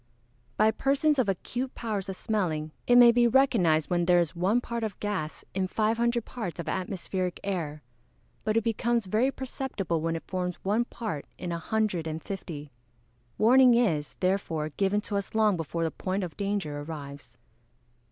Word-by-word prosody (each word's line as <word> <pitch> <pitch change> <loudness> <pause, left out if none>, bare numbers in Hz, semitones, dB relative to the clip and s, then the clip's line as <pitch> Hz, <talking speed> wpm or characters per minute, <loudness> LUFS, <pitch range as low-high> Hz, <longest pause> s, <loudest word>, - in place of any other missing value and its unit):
_ - - -39
By 215 +1 +5
persons 280 +5 +2
of 235 -6 +2
acute 245 +7 -3
powers 210 -4 -3
of 190 - -3
smelling 170 -9 -1 0.2
it 245 - +5
may 240 -1 +9
be 240 0 +4
recognised 200 - +3
when 175 -1 +2
there 175 0 +5
is 170 -1 +1
one 190 +7 +2
part 235 -1 -4
of 215 -4 -4
gas 195 -7 -3
in 190 -1 0
five 220 +3 +1
hundred 235 -1 +1
parts 215 -9 -5
of 170 - -5
atmospheric 185 -1 -2
air; 160 -7 -3 0.6
but 215 +1 +1
it 225 - +2
becomes 230 0 0
very 220 +7 +2
perceptible 250 - -3
when 165 +1 -1
it 165 - -5
forms 180 -1 -2
one 215 +5 +1
part 215 -13 -5
in 180 - -4
a 170 - -2
hundred 195 -3 -1
and 160 0 -4
fifty. 155 -7 -6 0.7
Warning 250 +2 +6
is, 165 -12 +1
therefore, 175 -5 0
given 195 +6 0
to 205 -1 -3
us 200 +2 -5
long 215 -3 +4
before 165 0 -3
the 165 - 0
point 190 +1 -2
of 175 -3 -6
danger 200 -8 -2
arrives. 145 -2 -8
195 Hz, 180 wpm, -28 LUFS, 170-230 Hz, 0.7 s, may